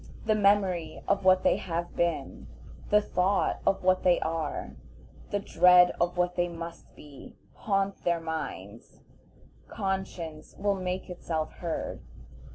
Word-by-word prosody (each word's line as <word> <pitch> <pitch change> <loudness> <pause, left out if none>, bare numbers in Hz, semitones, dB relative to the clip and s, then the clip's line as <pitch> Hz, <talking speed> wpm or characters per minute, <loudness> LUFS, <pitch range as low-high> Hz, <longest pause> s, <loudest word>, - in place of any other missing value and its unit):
The 220 - +3
memory 195 -6 +2
of 200 0 +1
what 185 0 +5
they - - +3
have 170 -1 -4
been, 155 - -2 0.4
the 210 0 +5
thought 190 0 +1
of 195 - +2
what 185 0 +3
they 180 -1 +4
are, 160 -2 -3 0.6
the 205 - 0
dread 180 -2 +5
of 175 +1 0
what 180 0 +1
they 175 0 +1
must 170 0 -9
be, 145 -3 -13 0.2
haunt 195 -1 -1
their 170 -1 +1
minds; 150 - -7 0.6
conscience 190 -6 -4
will 200 0 +1
make 185 -1 -3
itself 165 -3 -3
heard. 170 -2 -5
180 Hz, 135 wpm, -28 LUFS, 165-195 Hz, 0.6 s, what